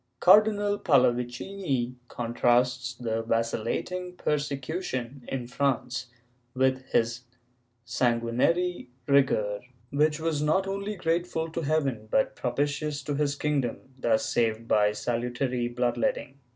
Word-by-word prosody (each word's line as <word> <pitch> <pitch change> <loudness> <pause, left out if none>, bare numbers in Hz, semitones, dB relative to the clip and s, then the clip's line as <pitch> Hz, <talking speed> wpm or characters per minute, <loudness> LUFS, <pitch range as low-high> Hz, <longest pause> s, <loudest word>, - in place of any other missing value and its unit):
Cardinal 205 +1 +5
Pallavicini 125 0 +1
contrasts 125 +2 +1
the 115 -2 -2
vacillating 115 +11 -2
persecution 140 -4 -3
in 130 -2 -3
France 125 0 -1 0.5
with 130 0 +2
his 115 +2 0 0.6
sanguinary 125 +8 +1 0.2
rigor, 110 -8 +2 0.3
which 150 +2 +2
was 160 -2 -1
not 155 +6 +2
only 200 +2 -3
grateful 165 -2 -1
to 165 - -3
heaven 140 -8 0
but 110 - +1
propitious 145 +3 -1
to 145 - -2
his 145 0 0
kingdom, 140 -5 0 0.2
thus 115 -4 +1
saved 115 -1 0
by 105 -2 +4
salutary 120 +2 -1
blood 120 0 -1
letting. 195 - -1
130 Hz, 110 wpm, -27 LUFS, 120-155 Hz, 0.6 s, Cardinal